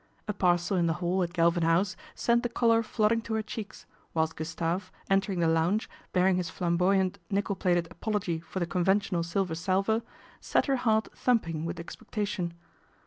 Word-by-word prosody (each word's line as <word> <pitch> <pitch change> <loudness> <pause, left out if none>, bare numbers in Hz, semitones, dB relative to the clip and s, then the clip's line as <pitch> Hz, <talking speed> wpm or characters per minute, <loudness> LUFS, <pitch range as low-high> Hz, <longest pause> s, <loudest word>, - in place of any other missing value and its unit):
A 210 - -1
parcel 180 0 +2
in 170 -1 +2
the 165 - +2
hall 180 +2 0
at 175 -1 -1
Galvin 170 0 +2
House 170 +4 +2 0.2
sent 235 0 +2
the 240 - -2
colour 230 -1 +3
flooding 225 0 +1
to 225 -1 -3
her 220 - 0
cheeks, 215 -1 -7 0.3
whilst 160 0 +1
Gustave, 165 +3 -2 0.3
entering 195 -2 +2
the 165 - +3
lounge, 165 +6 +2 0.2
bear 180 0 +3
ing 190 -1 +3
his 180 -2 -2
flamboyant 185 +3 +1
nickle 200 0 0
plated 175 -2 +1
apology 185 -4 -2
for 175 +3 -6
the 175 - +1
conventional 190 +1 +1
silver 170 +1 -1
salver, 195 +6 +1 0.4
set - - +1
her 275 -2 +1
heart 220 -3 +2
thumping 165 -11 +1
with 170 +1 -4
expectation. 195 -1 -4
185 Hz, 175 wpm, -29 LUFS, 170-210 Hz, 0.4 s, colour